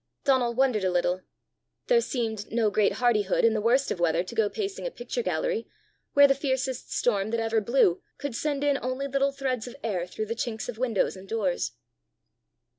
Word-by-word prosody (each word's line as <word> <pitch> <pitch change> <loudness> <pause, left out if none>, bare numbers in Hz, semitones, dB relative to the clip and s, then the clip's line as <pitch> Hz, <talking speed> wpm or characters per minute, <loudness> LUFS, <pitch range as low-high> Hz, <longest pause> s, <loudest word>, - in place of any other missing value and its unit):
Donal 250 -4 +2
wondered 255 -5 +2
a 185 - +2
little: 180 +1 +1 0.6
there 480 -1 +4
seemed 225 - -3
no 225 -2 +2
great 210 -1 +3
hardihood 220 -6 +2
in 230 - +4
the 215 - 0
worst 250 +5 +2
of - - -2
weather 170 0 +2
to 185 - -9
go 220 -3 +2
pacing 405 - -4
a - - -2
picture 485 0 -4
gallery, 485 -1 -1 0.5
where 285 0 +8
the 275 - +4
fiercest 265 -2 -2
storm 205 -4 +1
that 230 +1 -1
ever 225 0 +1
blew 210 -5 +3 0.2
could 285 -5 -4
send 290 +1 -1
in 285 -1 +2
only 255 +2 -2
little 275 0 +1
threads 260 -4 -2
of 245 - -9
air 185 -6 -1
through 215 +4 -4
the 220 - -3
chinks 225 -2 -3
of 240 -2 -6
windows 235 -7 +1
and 190 0 -12
doors! 195 - -1
235 Hz, 195 wpm, -27 LUFS, 210-275 Hz, 0.6 s, where